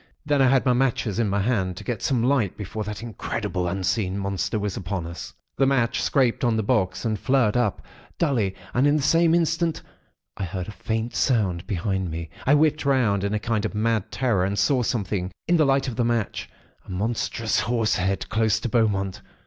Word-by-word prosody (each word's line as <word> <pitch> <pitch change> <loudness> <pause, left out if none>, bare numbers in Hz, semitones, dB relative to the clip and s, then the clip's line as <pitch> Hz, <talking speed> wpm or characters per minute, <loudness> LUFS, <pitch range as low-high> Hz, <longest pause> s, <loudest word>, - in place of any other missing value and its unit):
Then 145 -2 +2
I 130 - +5
had 130 +1 +3
my 125 - +4
matches 120 -4 0
in 110 -3 +1
my 100 +1 +1
hand, 95 -5 0
to 105 - -7
get 115 -1 -3
some 125 -4 +1
light 125 -7 +1
before 105 +1 -5
that 105 +2 -6
incredible, 100 -5 -3
unseen 95 +1 -1
Monster 100 +2 -2
was 105 -2 -2
upon 95 -2 -3
us. 85 +1 -8 0.2
"The 135 - +3
match 120 -4 +1
scraped 130 -5 +1
on 120 -2 +2
the 110 - 0
box, 100 -2 0
and 110 -2 -1
flared 130 -5 +2
up, 120 -6 0 0.3
dully; 115 - +1 0.2
and 130 +4 +3
in 145 - +3
the 150 - 0
same 165 +2 +4
instant, 165 -1 0 0.5
I - - -3
heard 90 0 -4
a - - -6
faint 110 +2 -3
sound 95 -9 +1
behind 95 -1 -1
me. 80 0 -6 0.2
I 145 - +6
whipped 155 0 +2
round, 120 -8 +2
in 100 +1 0
a - - 0
kind 110 -1 -1
of - - -3
mad 110 -1 0
terror, 115 -9 +1
and 100 +2 -1
saw 125 +7 +3
something, 100 -5 -2 0.2
in 175 +1 +4
the 155 - +4
light 135 0 +2
of 120 -3 -4
the 120 - +2
match—a 115 -3 -4
monstrous 110 +3 -1
horse 115 -2 +1
head, 95 +1 -1
close 110 0 +2
to 120 - -2
Beaumont. 105 -4 0
110 Hz, 205 wpm, -24 LUFS, 100-125 Hz, 0.5 s, I